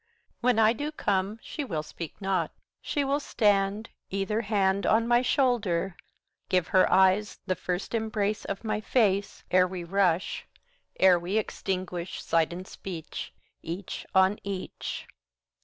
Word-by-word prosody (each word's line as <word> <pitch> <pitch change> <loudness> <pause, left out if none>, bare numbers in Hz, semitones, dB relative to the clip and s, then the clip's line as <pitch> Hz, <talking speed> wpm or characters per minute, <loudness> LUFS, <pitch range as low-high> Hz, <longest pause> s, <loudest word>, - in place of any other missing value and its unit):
When 245 -1 +2
I 220 0 +5
do 290 +5 -3
come, 200 -6 0
she 300 - -4
will 165 - -3
speak 160 +1 -8
not, 190 -5 0 0.3
she 290 - -1
will 280 +1 +1
stand, 205 -4 +1 0.2
Either 195 +3 -1
hand 200 -2 +1
On 225 +1 +3
my 240 0 +5
shoulder, 220 -9 +1 0.5
give 180 -3 +2
her 185 - +4
eyes 190 +2 +4
the 185 - +1
first 180 +2 -3
embrace 215 -2 -1
Of 195 +2 -5
my 215 -1 -1
face, 200 -4 +1
70 - - +1
Ere 185 0 +6
we 180 -1 -5
rush, 185 0 +1 0.5
ere 185 -2 +6
we 180 +5 -1
extinguish 185 -3 -3
sight 165 -1 +2
and 180 +2 -7
speech 170 -5 -7 0.3
Each 175 +3 -6
on 190 +2 +4
each. 195 -2 -5
195 Hz, 145 wpm, -28 LUFS, 185-220 Hz, 0.5 s, Ere